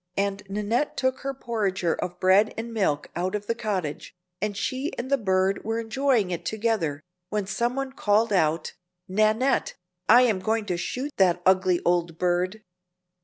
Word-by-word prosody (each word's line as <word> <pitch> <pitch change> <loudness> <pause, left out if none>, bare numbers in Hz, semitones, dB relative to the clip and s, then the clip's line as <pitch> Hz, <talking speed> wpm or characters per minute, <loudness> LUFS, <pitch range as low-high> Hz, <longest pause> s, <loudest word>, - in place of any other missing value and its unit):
and 200 0 0
Nannette 210 +8 -1
took 260 0 0
her 275 - -3
porringer 205 -9 -1
of 175 0 -5
bread 190 +3 +4
and 230 +1 -5
milk 170 -10 0
out 185 +3 -1
of 205 0 -4
the 230 - 0
cottage, 195 -12 -4 0.3
and 205 -1 -2
she 260 +7 -2
and 255 +3 -5
the - - +6
bird 190 -1 +1
were 225 +1 -1
enjoying 230 -3 +1
it 175 - -3
together, 205 -10 -1 0.3
when 210 -2 -1
some 235 +5 -1
one 270 -1 -3
called 215 -3 +2
out, 160 -3 +1 0.3
"Nannette, 215 +7 +2 0.3
I 240 +3 +8
am 220 -6 +2
going 220 +2 0
to 180 -3 -1
shoot 260 +11 -3
that 180 -2 +3
ugly 185 -1 +4
old 170 -2 +1
bird!" 180 +4 0
205 Hz, 170 wpm, -25 LUFS, 185-230 Hz, 0.3 s, I